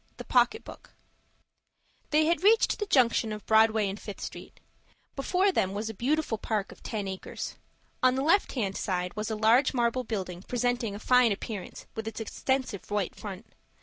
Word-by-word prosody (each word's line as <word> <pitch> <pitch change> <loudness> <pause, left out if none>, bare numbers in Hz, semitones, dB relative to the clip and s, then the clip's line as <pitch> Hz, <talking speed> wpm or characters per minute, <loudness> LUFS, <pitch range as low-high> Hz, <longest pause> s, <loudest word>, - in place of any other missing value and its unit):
THE - - -7
POCKET 440 +1 +3
BOOK - - -12 1.2
They 305 +1 +4
had 335 +2 +1
reached 445 +4 +4
the 415 - -2
junction 235 - +3
of 210 -1 -6
Broadway 220 -1 +4
and 195 +2 -4
of - - -16
Fifth 205 - -6
Avenue. - - -10 0.7
Before 365 +8 +2
them 195 - 0
was 220 +2 -3
a - - -11
beautiful 255 0 0
park 210 -4 -2
of - - -15
ten 210 -3 -4
acres. 190 -1 -6 0.5
On 255 0 +4
the 265 - 0
left 340 +7 +3
hand 200 -7 -2
side 180 -2 -2
was 215 +1 -3
a 220 - -1
large 230 +6 +4
marble 240 +1 +1
building, 185 -6 -4
presenting 245 -1 -1
a - - -7
fine 250 0 +4
appearance 200 -1 -5
with 220 0 -5
its 225 - -5
extensive 255 -1 -2
white 205 -3 -1
front. 205 0 -8
225 Hz, 180 wpm, -28 LUFS, 205-260 Hz, 1.2 s, They